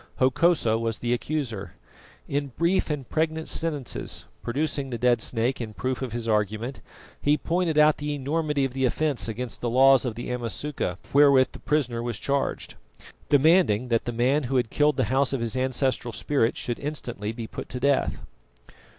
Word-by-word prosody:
Hokosa 130 -3 +3
was 115 -2 -2
the 120 0 -1
accuser. 120 - -3 0.5
In 140 0 -1
brief 170 +3 +2
and 145 -5 -3
pregnant 160 0 -1
sentences, 150 -7 -3 0.2
producing 140 +2 -2
the 120 - -3
dead 120 -1 +2
snake 120 +3 0
in 110 -2 -6
proof 130 0 -2
of 130 -3 -3
his 115 0 -4
argument, 110 +4 -1 0.4
he 145 +1 +3
pointed 165 +1 0
out 150 0 +5
the 150 0 -2
enormity 145 0 0
of 130 - -4
the 135 0 -2
offence 145 +1 0
against 115 0 -5
the 120 - -1
laws 135 +1 +6
of 120 -4 -3
the 120 +1 -5
Amasuka 120 -4 -3 0.2
wherewith 140 -2 +6
the - - -10
prisoner 125 -6 0
was 120 -3 -3
charged, 140 +5 -2 0.6
demanding 145 - +4
that 115 -1 +1
the 120 - -2
man 130 +5 +1
who 135 +2 -2
had 120 -3 +1
killed 150 -1 +2
the 130 - +2
house 135 0 +2
of 135 - 0
his 115 0 -2
ancestral 130 -2 0
spirit 125 -3 0
should 120 - -3
instantly 120 -8 -4
be 115 0 -6
put - - -8
to 125 - -5
death. 140 +1 +1
130 Hz, 175 wpm, -26 LUFS, 120-145 Hz, 0.6 s, laws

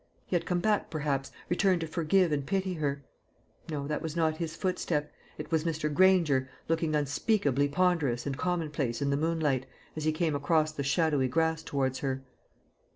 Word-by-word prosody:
He - - -2
had 175 - 0
come 175 -1 +1
back, 210 +1 +1
perhaps, 145 -4 -2 0.2
returned 180 -1 +2
to 165 - -2
forgive 170 +2 +2
and 145 -2 0
pity 190 +5 -1
her. 140 -4 -2 0.7
No, 145 -3 -3
that 150 +1 -2
was 160 -1 -4
not 160 -2 +1
his 165 -1 -4
footstep; 170 -5 -1 0.2
it - - -7
was 160 -1 +2
Mr. 155 -2 -1
Granger, 160 -7 +4 0.2
looking 165 -1 +1
unspeakably 145 - +1
ponderous 145 -6 +1
and 140 -2 -2
commonplace 150 -6 -1
in 140 - +1
the - - +2
moonlight, 150 -4 0 0.3
as 155 - -4
he 155 - +2
came 155 0 0
across 155 +2 +2
the 155 - -5
shadowy 140 -1 +2
grass 160 +3 +1
towards 135 -4 -1
her. 135 -1 -2
155 Hz, 175 wpm, -29 LUFS, 140-170 Hz, 0.7 s, Granger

